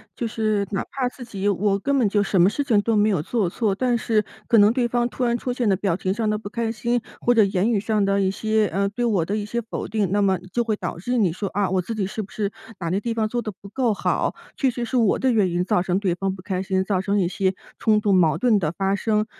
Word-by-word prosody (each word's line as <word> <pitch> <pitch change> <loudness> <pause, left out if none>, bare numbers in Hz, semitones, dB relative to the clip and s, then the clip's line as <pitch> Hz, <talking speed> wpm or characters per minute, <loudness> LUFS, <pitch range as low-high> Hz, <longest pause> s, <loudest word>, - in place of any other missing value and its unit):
就 235 - -2
是 215 -2 0
哪 195 - -2
怕 255 -2 -1
自 250 -1 -11
己 205 -3 -2
“我 200 +1 +1
根 280 +6 0
本 240 -6 +3
就 205 0 +2
什 195 -2 +1
么 175 - +6
事 285 - -1
情 230 -7 +3
都 225 -1 +1
没 210 +1 +3
有 170 -7 0
做 210 -5 0
错”， 210 0 0
但 245 +3 +1
是 220 -2 +1 0.2
可 230 - +5
能 205 +2 +6
对 245 -1 +1
方 240 0 0
突 250 +3 -2
然 235 0 +2
出 250 +1 -3
现 245 -2 -1
的 195 - +4
表 185 -2 -1
情 185 0 -1
上 220 0 -1
的 210 - 0
不 210 - -8
开 230 -1 -1
心， 235 +1 -1 0.2
或 245 - +3
者 220 -3 +5
言 195 +3 +1
语 210 - +2
上 210 -1 +1
的 195 0 +2
一 190 - +2
些， 215 +1 +1
呃， 200 +1 0
对 240 +4 -3
我 200 -8 +1
的 200 +5 -2
一 210 - -2
些 235 +3 -3
否 230 - -5
定 205 -3 0
那 205 0 +2
么 190 -2 +3 0.2
就 240 - +1
会 220 -2 0
导 175 -4 -5
致 245 +6 -1
你 185 -7 +2
说 200 0 -4
“啊！ 200 -1 0
我 185 -1 +2
自 225 +5 -5
己 200 -3 -1
是 215 +3 -4
不 200 - -10
是 205 -2 -2 0.3
哪 170 -2 -3
个 195 - +1
地 235 - -2
方 220 -1 +1
做 240 +2 -2
的 215 -2 -4
不 200 - -11
够 245 +1 0
好， - - 0 0.2
确 270 - +1
实 240 -1 -3
是 255 - -1
我 225 -5 +3
的 260 -1 +1
原 205 -5 +3
因 175 +1 -1
造 180 - +2
成 180 0 0
对 190 -4 0
方 190 +2 -2
不 185 - -12
开 185 -2 -2
心， 190 -1 0
造 190 -2 0
成 200 +1 0
一 180 - +2
些 190 +1 0 0.2
冲 215 -2 +3
突 205 -1 +1
矛 165 -4 +4
盾 220 -1 +3
的 155 -3 -1
发 195 0 +1
生”。 215 +1 0
210 Hz, 315 characters per minute, -23 LUFS, 195-230 Hz, 0.3 s, 么